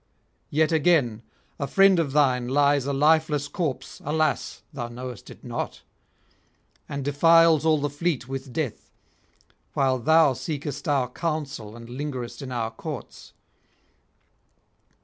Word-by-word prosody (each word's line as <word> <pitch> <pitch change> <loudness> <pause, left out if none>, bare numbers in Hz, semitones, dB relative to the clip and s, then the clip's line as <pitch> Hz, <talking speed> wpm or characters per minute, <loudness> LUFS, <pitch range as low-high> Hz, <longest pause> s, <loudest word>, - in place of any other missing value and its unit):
Yet 155 +2 +2
again, 150 -9 +2 0.4
a 140 - -2
friend 195 0 +5
of 155 -5 0
thine 130 -4 +2
lies 140 0 +2
a - - 0
lifeless 150 0 +2
corpse, 145 -2 -4
alas! 155 +1 -1
thou 120 -4 -4
knowest 125 -1 -8
it - - -13
not, - - -5 1.1
and 140 -2 -4
defiles 165 +2 +5
all 155 -1 +4
the 145 0 -1
fleet 145 -3 -2
with 135 0 -6
death, 135 -3 -4 0.9
while 130 -2 +2
thou 160 +2 +5
seekest 145 +1 -5
our 140 -4 +2
counsel 140 -6 -4
and 115 0 -11
lingerest 130 0 -5
in 135 -2 -6
our 115 -2 -2
courts. 145 +4 -8
145 Hz, 130 wpm, -25 LUFS, 130-155 Hz, 1.1 s, friend